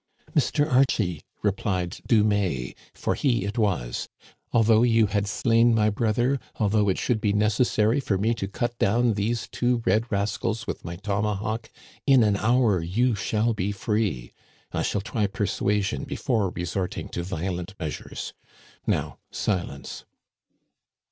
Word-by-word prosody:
" - - -26
Mr. 145 - +2
Archie," 120 - +2 0.2
replied 95 -3 -1
Dumais, 100 - +2 0.2
for - - -2
he 120 -8 +1
it 105 +4 -3
was, 75 - -1 0.2
" - - -33
al 115 - +4
though 110 0 +5
you 115 -2 +4
had 100 0 0
slain 115 +3 +3
my 105 -1 +3
brother, 120 +5 +1 0.2
although 105 -1 +2
it 95 - +1
should 115 -3 0
be 105 -1 +2
necessary 110 +3 +2
for 105 -7 0
me 110 +4 +1
to 115 -4 -3
cut 120 +4 -2
down 115 +3 +3
these 110 +3 -1
two 120 -1 0
red 115 +3 +2
rascals 100 +1 -1
with - - -5
my 85 0 -5
tomahawk, 105 +3 -2 0.4
in 135 -4 +6
an 105 -2 +3
hour 110 -3 +3
you 115 +9 +1
shall 110 +4 0
be 100 -1 -1
free. 100 - -1 0.4
I - - -1
shall 105 - 0
try 105 0 -1
persuasion 100 -4 -1
before 110 -7 0
resorting 90 +1 -3
to 85 - -3
violent 90 +1 -4
measures. 80 -3 -5 0.5
Now - - -1
silence." 85 -9 -3
105 Hz, 150 wpm, -25 LUFS, 95-115 Hz, 0.5 s, in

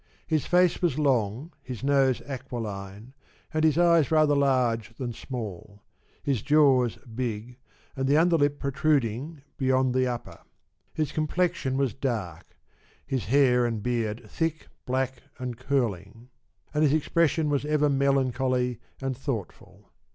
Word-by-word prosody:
His 155 -3 0
face 180 -1 +3
was 165 -6 +1
long, 130 - 0
his 130 -3 -7
nose 135 -2 +3
aquiline, 110 -4 -6 0.4
and 155 0 +1
his 155 -1 +3
eyes 170 -4 +4
rather 155 -2 +4
large 125 -5 +1
than 120 -3 -4
small; 105 -5 -7 0.4
his 135 -6 0
jaws 135 -5 +4
big, 120 0 -5 0.4
and 135 0 -1
the 145 +2 +4
under 170 +1 +4
lip 145 -1 +1
protruding 140 0 -1
beyond 130 -1 +2
the 130 0 +2
upper. 120 -1 -5 0.5
His 155 -3 -2
com 155 0 -1
plexion 165 -6 0
was 135 -4 0
dark, 110 - -4 0.5
his 130 -7 -2
hair 125 +1 +4
and 115 -3 -2
beard 115 -2 -2
thick, 165 -2 -2 0.2
black, 130 0 -1 0.2
and 125 -1 -4
curling, 115 -3 -2 0.4
and 150 - +1
his 150 -2 +4
expression 155 0 +1
was 140 -1 +1
ever 150 0 +2
melancholy 130 -3 +1 0.2
and 135 -1 -1
thoughtful. 125 - -6
130 Hz, 135 wpm, -27 LUFS, 120-145 Hz, 0.5 s, eyes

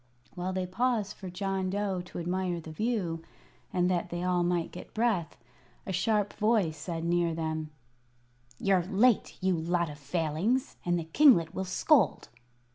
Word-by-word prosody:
While 180 0 -3
they 185 -1 -1
paused 215 +1 0
for 190 - -8
John 190 +1 -2
Dough 195 -1 -1
to - - -9
admire 175 0 -1
the 160 -1 -9
view, 180 -3 -1 0.5
and 180 -1 +2
that 175 0 -1
they 175 0 -3
all 180 -1 +2
might 175 -1 0
get 180 - -10
breath, 220 -7 0 0.5
a 190 - -3
sharp 205 +3 +1
voice 210 -7 +2
said 165 +2 -5
near 170 -1 +1
them: 160 -1 -3 0.9
"You're 195 +3 +3
late, 205 +6 +2
you 185 -1 +2
lot 170 0 0
of 145 - -11
Failings, 165 - -1
and 175 0 +1
the 170 - -2
kinglet 170 - +5
will 190 - -3
scold." 230 - +2
180 Hz, 160 wpm, -29 LUFS, 170-200 Hz, 0.9 s, kinglet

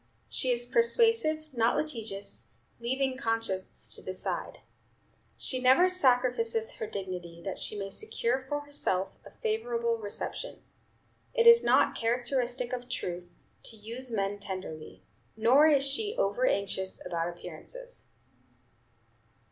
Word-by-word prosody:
She 255 - +1
is 240 -1 +2
persuasive, 455 - +3
not 235 -1 +2
litigious, 225 -9 -3 0.3
leaving 260 +2 -1
conscience 225 -6 -2
to - - -5
decide. - - -4 0.8
She 255 -1 -1
never 265 +9 +6
sacrificeth 245 -8 +2
her 220 - -3
dignity 180 -4 -6
that 195 - -4
she 210 - -4
may 195 -1 -4
secure 265 - -1
for 290 0 -1
herself 285 -10 -2
a - - -12
favorable 465 +1 -1
reception. - - -5 0.7
It 470 -1 +3
is 465 0 +9
not - - +4
a - - -5
characteristic 245 +1 0
of 245 0 -4
Truth 180 -7 -4 0.3
to 225 - -7
use 230 +4 -6
men 205 -2 -1
tenderly; 185 -6 -6 0.3
nor 255 +8 +6
is 285 -3 +4
she 410 - 0
overanxious 200 - 0
about 170 -1 -1
appearances." - - -9
245 Hz, 125 wpm, -30 LUFS, 205-310 Hz, 0.8 s, is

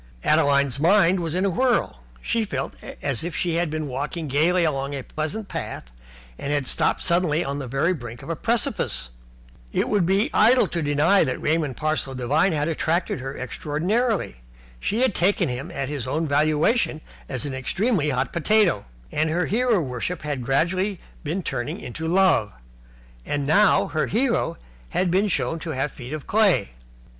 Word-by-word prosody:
Adeline's 140 -2 +3
mind 185 +2 +4
was 165 -1 -2
in 185 +2 +1
a - - +3
whirl. 250 +6 +1 0.2
She 230 -1 0
felt 135 -9 -3 0.3
as 135 -3 -1
if 170 -1 -4
she 175 -2 0
had 170 -1 0
been 155 0 -3
walking 145 +5 -4
gaily 165 +6 +2
along 140 -3 -1
a 135 - -5
pleasant 175 - -4
path - - -6 0.5
and 140 - -3
had 145 -2 0
stopped - - +1
suddenly 170 -2 +2
on 140 +1 -3
the 135 - -5
very 135 +8 +1
brink 120 -4 -8
of 145 - -9
a - - -1
precipice. 225 - -1 0.6
It - - 0
would 200 -5 +2
be 200 +10 +2
idle 240 +2 +5
to 170 - -2
deny 150 +6 +3
that 130 - -2
Raymond 155 -5 0
Parsloe 155 -3 -1
Devine 145 +9 +2
had 150 -1 0
attracted 165 0 0
her 135 +2 -6
extraordinarily. 170 - -1 0.4
She 220 - -1
had 260 -5 +3
taken 180 -3 +2
him 125 +2 -4
at 135 -1 -3
his 140 -3 -4
own 155 +5 -1
valuation 155 - +2 0.3
as 130 -1 -2
an 140 - -4
extremely 160 - 0
hot 130 -1 -1
potato, 180 - +2 0.3
and 155 +1 +1
her 175 +3 0
hero 235 0 +2
worship 140 +4 -3
had 145 -4 -3
gradually 180 - 0 0.2
been 170 +5 -2
turning 120 -5 -3
into 160 +7 -5
love. 175 - +3 0.7
And 145 - -2
now 195 +7 +4
her 155 - 0
hero 230 -7 0 0.3
had 180 -1 0
been 195 +4 +3
shown 165 -3 -1
to 165 - -6
have 135 +2 -1
feet 125 0 -9
of 155 -3 -5
clay. 200 - +2
155 Hz, 175 wpm, -24 LUFS, 140-185 Hz, 0.7 s, idle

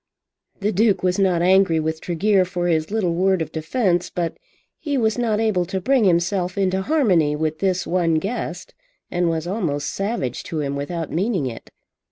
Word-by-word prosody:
The 205 +2 +1
Duke 210 0 +2
was 180 +1 +1
not 180 -3 +2
angry 185 -3 +4
with 160 0 -2
Tregear 190 +3 +2
for 180 -1 -3
his 160 -2 +1
little 200 -5 0
word 190 +2 +2
of 160 - -3
defence, 175 +1 0
but 170 -2 -3 0.4
he 290 -3 -2
was 220 -3 +1
not 220 -3 +1
able 215 -5 +1
to 190 +2 -3
bring 255 +3 +2
himself 180 +1 +1
into 190 -1 +1
harmony 190 - +2
with 155 0 -2
this 185 -2 0
one 170 -2 +1
guest, 220 - -4 0.4
and 175 -1 +1
was 165 0 -2
almost 175 -7 -2
savage 195 - -2
to 160 - -4
him 140 -1 -2
without 160 +3 -4
meaning 185 - 0
it. 120 -3 -7
180 Hz, 180 wpm, -22 LUFS, 165-200 Hz, 0.4 s, angry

